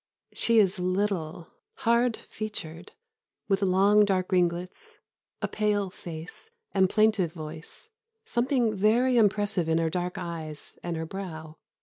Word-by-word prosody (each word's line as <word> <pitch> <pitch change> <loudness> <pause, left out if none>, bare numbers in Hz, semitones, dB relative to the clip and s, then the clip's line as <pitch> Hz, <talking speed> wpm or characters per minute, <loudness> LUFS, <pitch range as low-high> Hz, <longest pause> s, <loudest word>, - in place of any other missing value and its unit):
] - - -65
"She 230 -1 +2
is 195 -2 +4
little, 180 -3 -1 0.4
hard 235 0 +3
featured, 175 -6 -6 0.5
with 195 -1 +1
long 200 +2 +5
dark 190 -2 0
ringlets, 180 0 -1 0.5
a - - +2
pale 205 -3 0
face, 170 - -8 0.2
and 190 -2 +4
plaintive 215 -6 +2
voice, 160 - -8 0.3
something 240 - +1
very 235 +6 +3
impressive 205 -5 +2
in 160 - +3
her 165 -1 +1
dark 180 +1 -2
eyes 160 -3 -6
and 170 -1 -3
her 160 - -3
brow. 160 -4 -7
190 Hz, 130 wpm, -27 LUFS, 170-210 Hz, 0.5 s, long